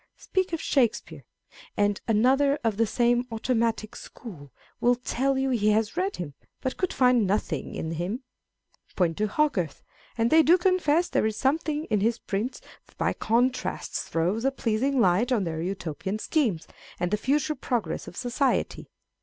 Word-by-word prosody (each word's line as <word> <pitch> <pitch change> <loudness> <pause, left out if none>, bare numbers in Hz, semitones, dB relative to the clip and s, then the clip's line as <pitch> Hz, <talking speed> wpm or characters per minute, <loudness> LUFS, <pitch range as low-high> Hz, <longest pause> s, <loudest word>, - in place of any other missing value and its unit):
Speak 375 -1 -1
of 330 - -2
Shakespeare, 240 -7 0 0.5
and 205 -1 +1
another 265 +6 +3
of 220 -3 0
the 230 0 +2
same 240 +2 +2
automci^", 225 -2 -1
school 150 - -11 0.3
will 245 +1 +4
tell 265 +2 -1
you 265 0 0
he 215 -4 +2
has 220 +3 0
read 380 +3 -1
him, 145 -5 -6 0.3
but 260 - -3
could 370 - -1
find 250 -6 +3
n\ 205 - +4
.iiing 155 -9 -5
in 160 - -3
him. 180 - -3 0.7
Point 170 -3 +1
to 215 - +2
Hogarth, 205 - 0 0.3
and 230 +1 +1
they 320 - +7
do 330 +4 +5
confess 350 -2 +2
there - - +1
is 220 - -3
something 300 +2 0
in 210 - +3
his 225 +3 +1
prints 225 +6 -3 0.3
that - - -25
by - - +1
contrast 245 +3 0
throws 180 +8 -1
a 270 - +3
pleasing 265 +1 0
light 205 +4 +3
on 225 -6 +2
their 160 -2 -3
Utopian 190 +1 -3
schemes, 220 - 0 0.3
and 175 +1 -1
the - - +3
future 295 +7 0
progress 240 - -3
of - - -9
society. 250 +2 -1
235 Hz, 170 wpm, -26 LUFS, 205-270 Hz, 0.7 s, they